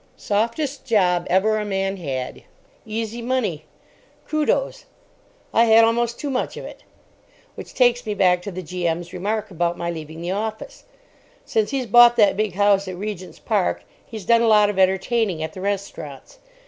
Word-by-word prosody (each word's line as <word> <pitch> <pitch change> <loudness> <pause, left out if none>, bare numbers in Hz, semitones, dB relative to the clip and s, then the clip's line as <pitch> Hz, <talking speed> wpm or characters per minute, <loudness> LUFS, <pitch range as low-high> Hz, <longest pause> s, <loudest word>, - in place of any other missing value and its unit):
Softest 235 +7 -2
job 180 -8 +1
ever 215 +4 +2
a - - -2
man 195 -1 -2
had. 135 -7 -5 0.5
Easy 225 +2 -4
money. 230 -11 -2 0.6
Kudos—I 305 - -2
had 225 0 +6
almost 235 +1 0
too 285 - -3
much 255 - -2
of - - -7
it. - - -11 0.7
Which - - -11
takes 245 -1 +3
me 210 - -2
back 180 -2 +3
to 200 - -6
the 185 0 -6
G.M.'s 170 0 -3
remark 205 +3 -3
about 175 0 -1
my 170 0 -3
leaving 160 -1 -8
the 175 +2 -4
office. 220 - -5 0.6
Since 220 -2 0
he's 270 -2 -2
bought 240 +2 +7
that 210 -4 +4
big 210 -3 -1
house 200 -1 +3
at 185 - -5
Regent's 195 -2 -6
Park 205 -5 -1 0.2
he's 215 -4 -9
done 230 +2 +4
a 235 - +2
lot 210 -2 +5
of 195 - -5
entertaining 190 -1 +1
at 160 - -5
the 185 - -8
restaurants. 195 -8 -5
205 Hz, 165 wpm, -22 LUFS, 180-230 Hz, 0.7 s, bought